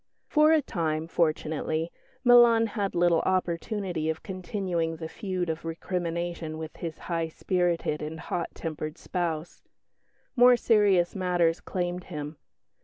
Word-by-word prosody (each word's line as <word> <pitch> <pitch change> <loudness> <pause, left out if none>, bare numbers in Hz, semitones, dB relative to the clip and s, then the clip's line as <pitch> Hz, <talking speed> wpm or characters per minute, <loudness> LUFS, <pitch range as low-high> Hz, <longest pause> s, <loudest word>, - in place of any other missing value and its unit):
For 305 0 +4
a 315 -2 +4
time, 160 -7 -1
fortunately, 160 0 -1 0.3
Milan 240 -2 +7
had 205 -3 -2
little 175 -1 +4
opportunity 180 -1 -1
of 160 - -3
continuing 185 -3 -2
the 160 0 -6
feud 185 -1 -3
of 160 0 -3
recrimination 170 -1 -3
with 160 0 -7
his 165 -2 -5
high 165 -2 -1
spirited 170 -2 -1
and 155 +1 -5
hot 170 +1 -3
tempered 155 -1 -5
spouse. 170 -2 -3 0.7
More 245 -1 +7
serious 205 -7 +3
matters 175 -3 +1
claimed 180 -1 -3
him. 150 -3 -6
175 Hz, 125 wpm, -27 LUFS, 160-190 Hz, 0.7 s, Milan